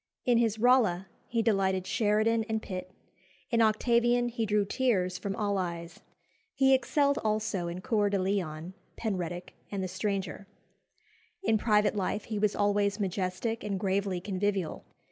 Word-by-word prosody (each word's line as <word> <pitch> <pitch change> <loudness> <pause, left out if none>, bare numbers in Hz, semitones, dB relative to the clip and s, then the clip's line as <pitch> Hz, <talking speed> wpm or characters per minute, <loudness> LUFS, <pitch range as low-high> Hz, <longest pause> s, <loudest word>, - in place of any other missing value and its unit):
In 240 -2 +4
his 225 -2 +1
Rolla 225 -6 +3 0.2
he 230 -1 0
delighted 190 -4 +1
Sheridan 215 +3 +2
and 220 0 0
Pitt; 185 -3 -6 0.6
in 230 -1 +3
Octavian 240 +2 +3
he 230 -2 -2
drew 205 0 +2
tears 195 -6 0
from 195 -1 -3
all 205 -2 0
eyes. 170 -2 -5 0.6
He 270 0 +5
excelled 280 +2 +2
also 215 -4 -1
in 175 +2 -5
Cœur 210 -1 +1
de 200 - +1
Lion, 185 -3 -2 0.2
Penruddock, 180 -5 -3 0.2
and 195 -2 -3
the - - -1
Stranger. 195 -1 -3 1.0
In 220 - +2
private 210 -1 +3
life 200 +1 -1
he 215 -2 -4
was 210 -1 +1
always 205 0 +1
majestic 195 +3 -2
and 200 -2 -2
gravely 195 -1 0
convivial. 195 -1 -2
205 Hz, 145 wpm, -29 LUFS, 185-225 Hz, 1.0 s, He